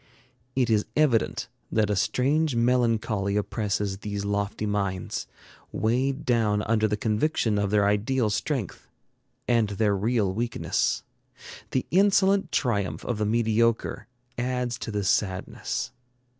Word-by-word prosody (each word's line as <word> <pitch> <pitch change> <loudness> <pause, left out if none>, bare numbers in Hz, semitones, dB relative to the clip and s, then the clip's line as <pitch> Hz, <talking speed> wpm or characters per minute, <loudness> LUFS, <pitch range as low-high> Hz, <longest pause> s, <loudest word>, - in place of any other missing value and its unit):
It 125 -3 +2
is 105 -1 +2
evident 145 -7 +2 0.2
that 105 -2 +2
a - - +1
strange 140 +7 +1
melancholy 115 -4 +1
oppresses 105 -2 -2
these 100 -1 -4
lofty 100 +1 -1
minds, 100 -3 -2 0.4
weighed 130 +5 0
down 110 -4 +2
under 110 -1 +2
the 105 0 -1
conviction 110 0 +1
of 100 -1 0
their 105 0 +3
ideal 110 +3 +1
strength 125 - -3 0.6
and 115 -3 +3
their 105 0 +1
real 105 -1 +1
weakness. 115 +3 -1 0.7
The 130 - -1
insolent 195 +1 +3
triumph 100 -7 -1
of 120 -4 -2
the 105 - +1
mediocre 115 +1 +1 0.3
adds 125 -1 -1
to - - -5
this 105 -2 -1
sadness. 95 -3 -1
110 Hz, 125 wpm, -26 LUFS, 105-125 Hz, 0.7 s, their